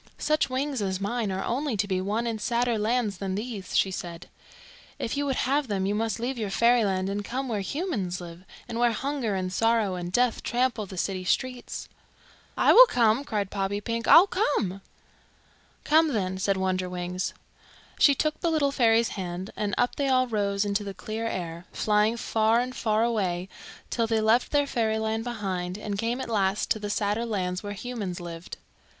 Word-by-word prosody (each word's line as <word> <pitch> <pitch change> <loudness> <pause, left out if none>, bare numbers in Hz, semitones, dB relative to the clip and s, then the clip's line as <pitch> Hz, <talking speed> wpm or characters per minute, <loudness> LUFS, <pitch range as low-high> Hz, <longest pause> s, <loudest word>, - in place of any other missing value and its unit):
"Such 305 -2 +1
wings 265 -1 -1
as 190 -2 -1
mine 210 +1 -1
are 190 +1 -2
only 265 -1 -1
to 200 +1 0
be 185 -2 0
won 210 +5 -1
in 225 -2 -2
sadder 235 0 0
lands 215 -2 0
than 190 -1 -2
these," 210 -3 -3
she 190 - +3
said. 175 -1 -6 0.7
"If 225 - -3
you 285 0 -1
would 270 - 0
have 275 +2 +1
them 195 -3 -1
you 200 - 0
must 225 +2 -1
leave 245 +1 -3
your 210 -3 -2
fairyland 205 -4 +2
and 200 +1 -2
come 260 +6 -3
where 220 -4 -1
humans 205 - -2
live, 175 0 -10 0.2
and 230 - -4
where 240 -1 +3
hunger 265 -4 -2
and 185 -1 -2
sorrow 225 -2 +2
and 175 -1 -4
death 245 +3 +2
trample 240 -4 0
the 185 - -9
city 185 +1 -2
streets." 250 +6 -2 0.7
"I - - +5
will - - +10
come!" 235 - +3
cried 205 -7 -2
Poppypink. 205 +4 -2
"I - - +10
will 345 - +8
come!" 255 - -1 1.0
"Come 320 +2 +4
then," 190 -3 -1
said 195 0 +1
Wonderwings. 185 -1 -2 0.7
She 280 - +6
took 305 +2 -1
the 340 - +1
little 300 -4 +2
fairy's 230 -4 +3
hand, 185 0 -5
and 205 -2 -2
up 245 - +1
they 280 - 0
all 255 -1 +3
rose 205 -3 0
into 200 +1 0
the 200 -1 -6
clear 220 +5 -4
air, 170 -4 -5
flying 215 +2 +2
far 225 0 +2
and 255 +1 -3
far 220 -2 +1
away 190 -6 -1 0.4
till 230 -2 +1
they 225 0 +1
left 220 +3 +3
their 290 -1 +3
fairyland 220 -3 -1
behind 190 -6 -3
and 210 -1 -4
came 235 +3 -1
at - - -4
last 200 -3 0
to 220 - +2
the 205 -1 -4
sadder 205 +2 0
lands 185 -5 -2
where 205 -1 -5
humans 205 -4 -5
lived. 170 -1 -8
215 Hz, 190 wpm, -27 LUFS, 190-245 Hz, 1.0 s, will